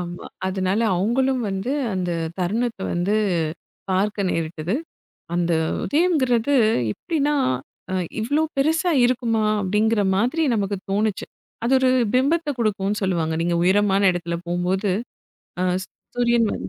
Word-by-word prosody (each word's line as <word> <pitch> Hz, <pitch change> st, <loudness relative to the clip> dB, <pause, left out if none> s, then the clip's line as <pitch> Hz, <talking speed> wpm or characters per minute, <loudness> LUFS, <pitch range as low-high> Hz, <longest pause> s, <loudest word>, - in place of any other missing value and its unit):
ஆமா. 175 Hz, 0 st, -6 dB, 0.2 s
அதனால 190 Hz, +2 st, 0 dB, 0.2 s
அவங்களும் 255 Hz, +7 st, +1 dB
வந்து 195 Hz, +7 st, -2 dB, 0.2 s
அந்தத் 170 Hz, -3 st, -2 dB
தருணத்த 220 Hz, +4 st, -1 dB
வந்து 175 Hz, +4 st, 0 dB, 0.8 s
பார்க்க 200 Hz, +1 st, 0 dB
நேரிட்டது. 165 Hz, +3 st, -2 dB, 0.6 s
அந்த 175 Hz, -1 st, +1 dB, 0.3 s
உதயம்ங்கிறது 285 Hz, -6 st, +2 dB, 0.4 s
எப்படின்னா, 295 Hz, -, -1 dB, 0.6 s
அ -, -, -1 dB, 0.3 s
இவ்ளோ 290 Hz, +8 st, +1 dB
பெருசா 320 Hz, +5 st, +2 dB
இருக்குமா? 235 Hz, -3 st, +1 dB, 0.2 s
அப்படிங்கிற 210 Hz, +3 st, +2 dB
மாதிரி 250 Hz, +10 st, +1 dB
நமக்குத் 200 Hz, -2 st, -2 dB
தோணுச்சு. 210 Hz, 0 st, 0 dB, 0.4 s
அது 245 Hz, -, +1 dB
ஒரு 260 Hz, -1 st, +3 dB, 0.2 s
பிம்பத்த 300 Hz, +5 st, +2 dB
கொடுக்கும்னு 205 Hz, -2 st, 0 dB
சொல்லுவாங்க. 170 Hz, -4 st, 0 dB
நீங்க 170 Hz, 0 st, 0 dB
உயரமான 195 Hz, +1 st, +3 dB
இடத்துல 170 Hz, -1 st, -3 dB
போம்போது. 180 Hz, +3 st, 0 dB, 0.7 s
அ -, -, +1 dB, 0.2 s
சூ -, -, -21 dB, 0.3 s
சூரியன் 235 Hz, -1 st, +3 dB
வந்து 95 Hz, -, -6 dB
205 Hz, 120 wpm, -22 LUFS, 185-245 Hz, 0.8 s, ஒரு